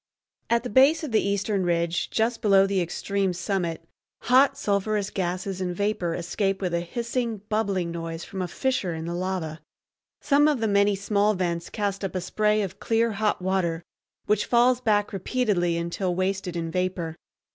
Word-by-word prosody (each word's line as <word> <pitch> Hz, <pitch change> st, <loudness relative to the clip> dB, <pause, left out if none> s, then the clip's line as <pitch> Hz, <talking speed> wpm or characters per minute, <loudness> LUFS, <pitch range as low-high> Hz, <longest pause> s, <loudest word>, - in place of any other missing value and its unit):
At 235 Hz, 0 st, +2 dB
the 250 Hz, -, -4 dB
base 280 Hz, +8 st, +5 dB
of 300 Hz, -, -4 dB
the 220 Hz, -, +3 dB
eastern 200 Hz, 0 st, 0 dB
ridge, 170 Hz, -1 st, 0 dB
just 225 Hz, +1 st, 0 dB
below 195 Hz, -3 st, +5 dB
the 195 Hz, -1 st, 0 dB
extreme 190 Hz, +2 st, -1 dB
summit, 175 Hz, -3 st, -2 dB, 0.4 s
hot 270 Hz, +2 st, +4 dB
sulphurous 205 Hz, -3 st, 0 dB
gases 185 Hz, +1 st, -3 dB
and 180 Hz, -1 st, -2 dB
vapor 195 Hz, -4 st, -1 dB
escape 195 Hz, +3 st, -1 dB
with 180 Hz, -3 st, -2 dB
a 170 Hz, -, +2 dB
hissing, 235 Hz, +4 st, -3 dB
bubbling 200 Hz, -5 st, 0 dB
noise 165 Hz, 0 st, -5 dB
from 190 Hz, -, -6 dB
a 180 Hz, -, -1 dB
fissure 190 Hz, -3 st, -1 dB
in 160 Hz, 0 st, -5 dB
the 170 Hz, -, -3 dB
lava. 175 Hz, -3 st, -3 dB, 0.6 s
Some 290 Hz, +1 st, +4 dB
of 295 Hz, -4 st, +2 dB
the 225 Hz, -, 0 dB
many 200 Hz, 0 st, +3 dB
small 205 Hz, +1 st, +1 dB
vents 170 Hz, -2 st, -2 dB
cast 200 Hz, -2 st, -2 dB
up 190 Hz, -2 st, -3 dB
a 185 Hz, -, -1 dB
spray 210 Hz, +3 st, +1 dB
of 190 Hz, -, -6 dB
clear 230 Hz, 0 st, +1 dB
hot 210 Hz, -2 st, -1 dB
water, 175 Hz, -3 st, 0 dB, 0.4 s
which 210 Hz, 0 st, +1 dB
falls 245 Hz, +1 st, +4 dB
back 205 Hz, -4 st, +1 dB
repeatedly 195 Hz, -4 st, 0 dB
until 170 Hz, +2 st, -2 dB
wasted 185 Hz, -1 st, -1 dB
in 165 Hz, -1 st, -3 dB
vapor. 180 Hz, -2 st, -2 dB
195 Hz, 175 wpm, -25 LUFS, 175-215 Hz, 0.6 s, base